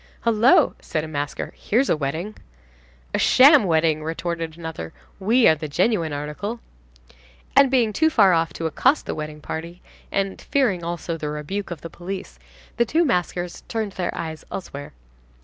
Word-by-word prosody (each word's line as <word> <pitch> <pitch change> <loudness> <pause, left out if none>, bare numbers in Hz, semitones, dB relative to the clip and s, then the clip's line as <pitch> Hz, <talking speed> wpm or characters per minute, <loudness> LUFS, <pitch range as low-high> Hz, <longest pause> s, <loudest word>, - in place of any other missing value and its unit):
"Hullo!" 230 +2 +4
said 155 - -3
a - - -5
masker, 145 -2 -4
"here's 250 +6 +1
a - - +3
wedding." 155 +8 -3 0.8
"A - - +1
sham 275 -2 +7
wedding," 160 -2 +2
retorted 165 0 -4
another. 160 - -6 0.3
"We 225 +6 +4
are - - +7
the 155 0 -5
genuine 165 +2 +1
article." 150 +11 -4 1.0
And, 275 0 +7
being 240 -5 +2
too 315 +8 +3
far 200 - +5
off 165 0 +1
to 165 - -5
accost 260 - +2
the - - -3
wedding 150 0 -6
party, 170 +4 -6 0.3
and 195 -1 -1
fearing 215 -11 +1
also, 170 0 -3
the 150 -2 -4
rebuke 150 +7 -4
of 175 -4 -6
the 165 - -7
police, 185 +4 -7 0.4
the 235 - +3
two 330 +8 +2
maskers 180 - -1
turned 220 -3 -2
their 185 -2 -3
eyes 160 -1 -5
elsewhere. 145 -6 -7
175 Hz, 165 wpm, -23 LUFS, 160-220 Hz, 1.0 s, sham